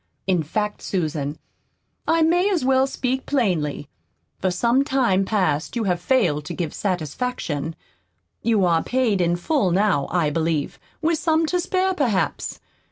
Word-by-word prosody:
In 185 Hz, -3 st, +2 dB
fact, 210 Hz, +7 st, -2 dB
Susan, 155 Hz, -5 st, -2 dB, 0.7 s
I 330 Hz, 0 st, +3 dB
may 350 Hz, +5 st, +3 dB
as 345 Hz, -10 st, 0 dB
well 265 Hz, 0 st, +3 dB
speak 260 Hz, 0 st, -2 dB
plainly. 175 Hz, -, 0 dB, 0.5 s
For 190 Hz, -, +1 dB
some 235 Hz, +9 st, +2 dB
time 245 Hz, -9 st, +2 dB
past 180 Hz, -7 st, 0 dB
you 235 Hz, -, 0 dB
have 180 Hz, -3 st, 0 dB
failed 175 Hz, -, +2 dB
to 170 Hz, -, -5 dB
give 165 Hz, -4 st, -3 dB
satisfaction. 165 Hz, -, -3 dB, 0.7 s
You 220 Hz, -5 st, +2 dB
are 165 Hz, -2 st, +3 dB
paid 240 Hz, -7 st, +1 dB
in 175 Hz, 0 st, +2 dB
full 195 Hz, -, +1 dB
now, 180 Hz, -6 st, +2 dB
I 170 Hz, -4 st, +1 dB
believe, 160 Hz, -1 st, -1 dB, 0.2 s
with 325 Hz, 0 st, +2 dB
some 320 Hz, -1 st, +2 dB
to 360 Hz, -, +3 dB
spare, 375 Hz, +1 st, +1 dB
perhaps. 225 Hz, -, -1 dB
195 Hz, 150 wpm, -23 LUFS, 165-265 Hz, 0.7 s, I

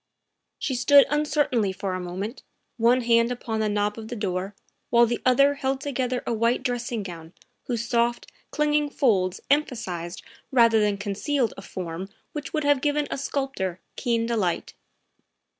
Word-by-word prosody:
She 270 Hz, -, -2 dB
stood 280 Hz, +3 st, +6 dB
uncertainly 290 Hz, -8 st, +1 dB
for 190 Hz, 0 st, -4 dB
a 185 Hz, -, -2 dB
moment, 185 Hz, +7 st, -5 dB, 0.4 s
one 240 Hz, +2 st, +4 dB
hand 230 Hz, 0 st, +3 dB
upon 230 Hz, -2 st, -3 dB
the 215 Hz, -1 st, +1 dB
knob 210 Hz, +1 st, 0 dB
of 220 Hz, -, -8 dB
the 245 Hz, -, -5 dB
door 195 Hz, -2 st, -3 dB, 0.3 s
while 235 Hz, 0 st, +6 dB
the 235 Hz, +1 st, -2 dB
other 275 Hz, +3 st, +5 dB
held 270 Hz, -1 st, -1 dB
together 255 Hz, -3 st, -2 dB
a -, -, -1 dB
white 230 Hz, +3 st, +1 dB
dressing 240 Hz, -3 st, -2 dB
gown 170 Hz, -3 st, -9 dB, 0.3 s
whose 235 Hz, -3 st, -2 dB
soft, 235 Hz, 0 st, +1 dB, 0.2 s
clinging 300 Hz, -1 st, +1 dB
folds 195 Hz, -10 st, +1 dB
empha 285 Hz, -3 st, +2 dB
sized 175 Hz, -4 st, -5 dB, 0.3 s
rather 230 Hz, -3 st, +5 dB
than 210 Hz, -1 st, +1 dB
concealed 225 Hz, +5 st, -1 dB
a -, -, -9 dB
form 185 Hz, -1 st, -6 dB, 0.2 s
which 295 Hz, +1 st, -6 dB
would 305 Hz, -2 st, -1 dB
have 285 Hz, -2 st, +3 dB
given 295 Hz, 0 st, +1 dB
a -, -, -2 dB
sculptor 270 Hz, -11 st, -2 dB, 0.2 s
keen 230 Hz, -3 st, 0 dB
delight. 215 Hz, -7 st, -1 dB
235 Hz, 160 wpm, -25 LUFS, 200-270 Hz, 0.4 s, stood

